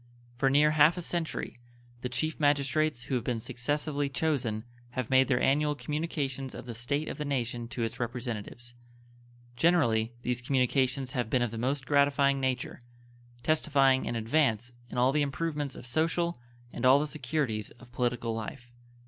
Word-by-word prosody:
For 135 +3 +2
near 150 +3 +5
half 155 +3 +5
a - - -2
century 165 -7 -3 0.4
the 125 - -3
Chief 155 +6 -2
Magistrates 145 -2 +2
who 130 - -5
have 125 -3 0
been 120 -2 -1
successively 145 +5 -2
chosen 135 -8 -1 0.3
have 130 0 -2
made 130 0 +5
their 125 -3 +2
annual 150 +2 +2
communications 145 -4 -3
of - - -8
the 120 - -6
state 140 +7 -2
of - - -5
the - - -1
nation 120 -4 -2
to 115 0 -3
its 115 +2 -3
representatives. 120 -1 -5 0.8
Generally 120 -8 +2
these 125 0 -1
communications 130 0 +1
have 125 -5 -2
been 125 0 +2
of 120 - -1
the 115 - -5
most 130 +2 -1
gratifying 140 -1 +3
nature, 130 -1 -2 0.6
testifying 140 -3 +3
an - - -2
advance 120 -1 +1 0.2
in - - -6
all 125 +2 +4
the 150 +1 +2
improvements 145 0 -2
of - - -9
social 165 +6 0 0.4
and - - -6
all 130 +2 +7
the 150 - 0
securities 135 -7 -2
of 120 0 -17
political 120 -2 -1
life. 115 +2 -6
130 Hz, 165 wpm, -29 LUFS, 120-150 Hz, 0.8 s, all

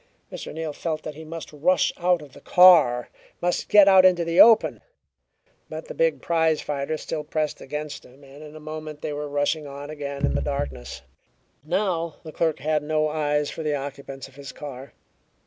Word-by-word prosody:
Mr. - - -7
Neal 160 -1 -5
felt 155 0 -4
that 155 - -6
he 160 +2 -10
must 160 0 -8
rush 165 +4 +2
out 175 -2 +1
of 140 - -15
the - - -14
car, 170 -10 +6 0.3
must 175 0 -1
get 205 -2 +7
out 190 -1 +7
into 180 -2 +4
the 165 +1 +5
open. 225 -1 +5 0.9
But - - -7
the - - -5
big - - 0
prize 160 -2 +2
fighter 145 +1 -3
still 155 0 -5
pressed 155 0 -3
against 150 +1 -6
him, 135 +3 -18
and 140 +2 -14
in 150 0 -11
a - - -9
moment 155 -1 -8
they 150 - -3
were 145 0 -5
rushing 145 +1 -1
on 140 +1 -8
again 140 -2 -3
into - - +1
the 70 - 0
darkness. 65 -3 -4 0.6
Now 170 0 -1
the 160 - -9
clerk 160 -1 0
had 150 +2 0
no 155 +1 0
eyes 150 -1 0
for - - -6
the 150 -2 -1
occupants 140 -1 -7
of 135 - -20
his 140 -1 -8
car. 135 -3 -9
155 Hz, 195 wpm, -24 LUFS, 145-165 Hz, 0.9 s, get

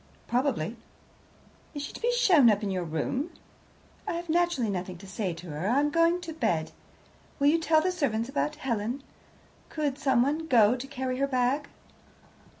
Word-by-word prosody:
"Probably." 240 - 0 1.0
"Is 290 - -4
she - - -7
to - - -9
be 480 +1 +2
shown 365 - +5
up 210 -1 +2
to - - -3
your 185 -2 -1
room?" 170 - -2 0.8
"I - - -1
have 340 0 -5
naturally 335 -9 +1
nothing 180 -1 -4
to 195 - -13
say 195 0 -3
to 170 -1 -9
her; 150 +6 -3
I 255 +4 +3
am 295 +1 +1
going 335 +2 +3
to 330 -2 -6
bed. 175 - -1 0.7
Will 280 - 0
you 330 +2 +3
tell 320 -1 +3
the 370 +3 +1
servants 240 -10 -1
about 295 +2 -1
Helen? 245 -2 -3 0.7
Could 290 -3 -2
someone 280 +3 +1
go 230 -4 +5
to 255 +2 -6
carry 260 -2 -3
her 275 - +2
bag?" 265 +2 0
270 Hz, 175 wpm, -28 LUFS, 220-310 Hz, 1.0 s, shown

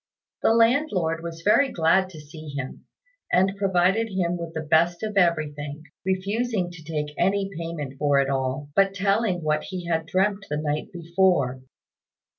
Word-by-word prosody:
The 225 - +4
landlord 225 - +2
was 165 0 -7
very 265 +6 +4
glad 180 +2 +3
to 165 -4 -11
see 155 +1 -11
him, 140 -2 -6 0.4
and 190 +2 +3
provided 195 +3 +2
him 180 -3 0
with 170 -1 -6
the 160 - -2
best 170 +4 +2
of 215 -1 -3
everything, 155 -5 0 0.2
refusing 190 +1 -1
to 170 -2 -11
take 150 -2 -3
any 195 +2 +1
payment 160 -5 -5
for 145 -1 +3
it 135 - +2
all, 135 +1 -2
but 195 0 +3
telling 195 -2 +1
what 155 0 0
he 185 -2 -6
had 165 -1 -1
dreamt 195 +2 0
the 150 - -1
night 150 0 -2
before. 170 -7 +1
170 Hz, 160 wpm, -25 LUFS, 155-195 Hz, 0.4 s, The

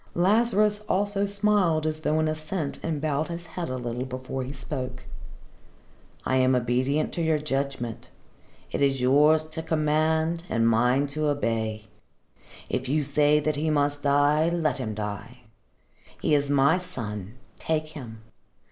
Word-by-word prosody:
Lazarus 210 +2 +3
also 205 +1 +1
smiled 200 -6 +2
as 155 0 -1
though 155 0 0
in 155 - +1
assent, 155 0 -3
and 160 -3 -2
bowed 150 0 -1
his 170 0 -6
head 175 -1 -5
a 130 - -3
little 120 0 -3
before 130 0 -5
he 130 - -6
spoke. 130 -1 -6 1.2
"I 130 - +1
am 130 0 +4
obedient 125 +5 0
to 170 - -2
your 160 -1 +2
judgment. 135 -5 -3 0.6
It - - -2
is 135 -1 +2
yours 150 +5 +5
to 160 - -4
command 160 +1 +1
and 115 -1 +2
mine 125 +5 +3
to 155 0 0
obey. 110 -6 -1 0.8
If - - -3
you 150 +2 +1
say 145 +1 +3
that 155 0 -1
he 155 +2 0
must 145 -1 +1
die, 145 +3 +3
let 165 -4 0
him 110 -4 -3
die. 110 +4 -6 0.8
He - - +1
is 145 -1 +2
my 145 +5 +4
son. 110 - -6 0.2
Take 155 -1 -1
him. 115 -8 -10
145 Hz, 150 wpm, -26 LUFS, 130-160 Hz, 1.2 s, yours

